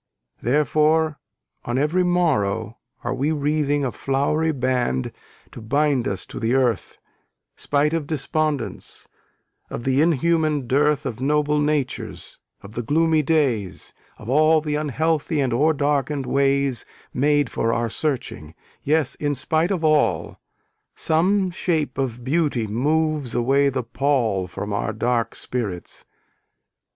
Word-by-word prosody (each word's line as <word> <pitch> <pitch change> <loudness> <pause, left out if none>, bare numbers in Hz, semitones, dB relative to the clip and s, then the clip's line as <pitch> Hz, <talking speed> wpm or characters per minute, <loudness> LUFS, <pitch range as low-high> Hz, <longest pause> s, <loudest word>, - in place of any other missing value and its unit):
Therefore, 150 +4 +2 0.4
on 120 +1 -2
every 150 +6 +2
morrow, 115 - 0 0.2
are 120 - -1
we 140 +4 0
wreathing 145 -1 0
A 125 - -1
flowery 145 +6 0
band 125 - -1 0.4
to - - -10
bind 140 +2 +1
us - - -3
to - - -8
the 120 +1 +1
earth, 125 -5 0 0.6
Spite 145 +2 0
of 160 -3 -2
despondence, 155 -1 -3 0.6
of - - -6
the 135 +2 +2
inhuman 155 -2 +2
dearth 145 +4 +2
Of 120 -4 -4
noble 150 +1 +1
natures, 150 -3 -2 0.2
of 100 - -10
the 120 - -3
gloomy 160 +5 +2
days, 135 - -1 0.2
Of 110 - -12
all 155 +5 +4
the 150 -1 -3
unhealthy 155 +2 0
and 130 -4 +1
o'er 150 +7 +3
darken'd 145 -1 0
ways 140 -2 +1 0.3
Made 145 -2 +2
for 115 - 0
our 115 0 0
searching: 120 - -3 0.3
yes, 155 +1 +1
in 145 -1 -2
spite 160 +6 +1
of 185 -5 -1
all, 155 -1 +1 0.6
Some 185 +4 +1
shape 155 -6 -1
of 125 -3 -2
beauty 140 -4 0
moves 150 +4 0
away 135 +4 +3
the 130 -2 -2
pall 115 -6 0
From 105 +3 -5
our 105 +2 -1
dark 115 +2 -1
spirits. 105 -8 -5
140 Hz, 130 wpm, -22 LUFS, 125-155 Hz, 0.6 s, all